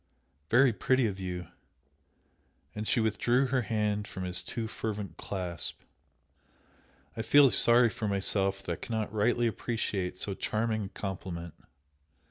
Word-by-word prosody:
"Very 125 +1 +5
pretty 130 +5 +2
of 100 -3 -2
you!" 90 -2 -5 1.2
and 105 0 -5
she 125 - +3
withdrew 115 +4 +2
her 130 0 +1
hand 105 -2 -1
from 95 - -6
his 90 0 -1
too 115 -2 -4
fervent 105 -6 -5
clasp, 90 -4 -4 1.3
"I - - -3
feel 135 +3 +6
sorry 120 0 +6
for 115 -3 -4
myself 95 -1 +1
that 90 - -4
I - - 0
cannot 110 -3 -3
rightly 120 +3 +2
appreciate 105 -5 -2
so 100 - -3
charming 110 +1 -1
a - - -7
compliment!" 90 -5 -6
105 Hz, 135 wpm, -30 LUFS, 95-115 Hz, 1.3 s, feel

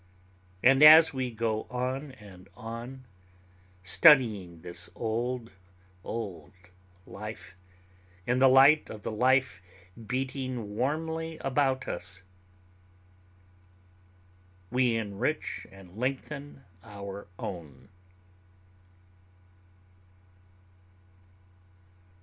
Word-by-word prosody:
And 135 +2 +5
as 160 +1 +9
we 130 -2 -2
go 110 -1 -2
on 130 +3 -3
and 100 -5 -15
on, 120 +3 -8 0.8
studying 95 - +4
this 85 0 -9
old, 120 +1 -3 0.5
old 95 -6 -6 0.5
life 105 -1 -9 0.7
in 125 +1 +1
the 135 - +6
light 135 +4 +6
of 105 -1 -9
the - - -3
life 130 0 +2 0.5
beating 130 -4 -4
warmly 160 +5 -2
about 135 -1 0
us, 90 +1 -5 2.5
we 125 -2 +2
enrich 115 +7 -3
and 95 -1 -15
lengthen 135 +3 -5 0.2
our 100 -2 -9
own. 85 -3 -8
120 Hz, 75 wpm, -28 LUFS, 100-135 Hz, 2.5 s, as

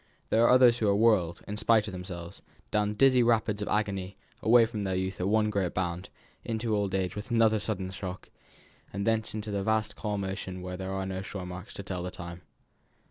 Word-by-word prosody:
There 115 - +4
are - - +5
others 125 -2 +6
who 110 - +1
are 100 - +4
whirled, 100 -6 +3
in 105 - -4
spite 110 -1 +3
of - - -4
themselves, 90 -1 -8 0.3
down 105 0 +1
dizzy 130 +1 +5
rapids 110 -3 +2
of 105 - -3
agony 100 -2 -1 0.2
away 115 +1 +6
from 110 -2 -4
their 95 -1 -1
youth 95 +1 -2
at 90 - 0
one 105 +1 +2
great 95 -4 -1
bound, 90 -1 -2 0.3
into 115 -1 -1
old 100 -2 0
age 95 -1 -1
with 105 +5 -6
another 115 -2 +4
sudden 100 -3 -3
shock; 95 -1 -7 0.6
and 100 +1 -3
thence 110 -1 0
into 105 0 -4
the 100 -1 -1
vast 110 +1 0
calm 105 -2 -3
ocean 95 -1 -5
where 90 0 -5
there 95 +1 -5
are 95 0 -2
no 95 0 -3
shore 95 -1 -6
marks 90 +1 -8
to 100 - -6
tell 90 -2 -4
of 90 - -7
time. 85 0 -8
100 Hz, 215 wpm, -29 LUFS, 95-110 Hz, 0.6 s, others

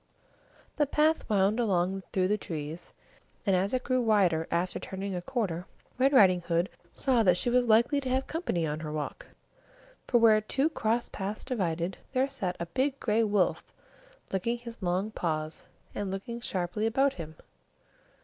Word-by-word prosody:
The 295 -2 +3
path 305 +1 +2
wound 205 +2 +2
along 190 -3 +1
through 185 -1 +2
the 210 - +2
trees, 155 0 -6 0.5
and, 195 -3 +3
as 190 +3 +1
it 255 -1 -1
grew 255 -1 +1
wider 190 -8 +3
after 180 +1 -1
turning 195 +1 -5
a 180 - -3
corner, 185 -6 -2 0.3
Red 270 +2 +4
Riding 190 -9 +6 0.5
saw 255 -4 +2
that 180 -4 +4
she 240 - +1
was 245 0 +3
likely 235 +6 +4
to 260 - -4
have 260 +1 +1
company 245 - -2
on 150 0 -3
her 155 -1 -5
walk; 150 -1 -5 0.8
for, 245 - +4
where 220 -2 +6
two 270 +8 +1
cross 235 -5 0
paths 200 +2 -5
divided, 180 -7 -2
there 260 +1 +2
sat 195 -10 -2
a 170 - -2
big 260 +10 -1
gray 225 0 +2
wolf 205 -4 +1 0.7
licking 230 +6 0
his 235 -1 -10
long 185 +4 0
paws, 155 -4 -3 0.3
and 205 -1 -3
looking 235 +5 -5
sharply 190 +1 -1
about 270 +4 +2
him. 160 -2 -8
205 Hz, 165 wpm, -29 LUFS, 180-245 Hz, 0.8 s, Riding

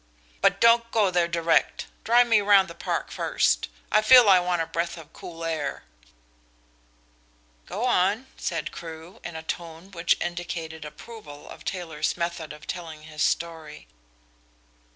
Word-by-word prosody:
But - - +3
don't 230 0 +5
go 210 -5 +2
there 175 -1 +2
direct. 170 -1 +1 0.2
Drive 240 +2 +5
me 225 -3 +4
round 200 -2 +5
the 170 - -9
Park - - -3
first. - - +1 0.2
I 215 - +5
feel 245 +1 +8
I 190 -2 +7
want 175 -2 0
a - - -5
breath 170 +1 -3
of 165 -1 -13
cool 165 -1 -9
air.'" 155 - -3 1.8
"Go 215 +6 -3
on," 210 +1 +2
said - - -3
Crewe, 165 +1 -10
in 175 - -7
a 160 - -6
tone 170 +3 -6
which 170 -2 +1
indicated 170 -2 -5
approval 150 -1 -11
of - - -11
Taylor's 165 -5 -3
method 170 -2 -3
of 150 0 -11
telling 160 -4 -7
his 155 -1 -8
story. 160 - -2
170 Hz, 150 wpm, -25 LUFS, 160-195 Hz, 1.8 s, feel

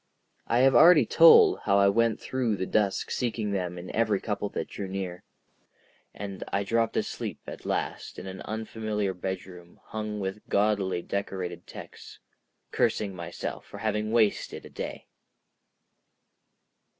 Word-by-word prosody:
I 120 +2 +3
have 135 0 +5
already 160 -5 +8
told 165 +8 +7
how 100 - +4
I 100 0 +5
went 115 +2 +2
through 125 -5 -1
the 95 - -2
dusk 100 0 0
seeking 115 -4 -1
them 90 -3 -2
in 90 +1 -7
every 110 -3 +2
couple 105 -1 -3
that - - -4
drew 100 - -6
near. 95 -2 -5 0.9
And 100 -2 -6
I 100 - -1
dropped 115 +2 0
asleep - - -3
at - - -8
last - - -3
in - - -7
an 95 0 -7
unfamiliar 110 -2 -3
bedroom 90 -1 -7
hung 105 -1 -4
with 95 +1 -5
gaudily 100 -3 +1
decorated 95 -3 -4
texts, - - -11 0.5
cursing 100 -2 +1
myself 85 -2 -6
for - - -10
having 110 0 -1
wasted 110 -3 +1
a - - -12
day. - - -6
100 Hz, 140 wpm, -27 LUFS, 95-110 Hz, 0.9 s, already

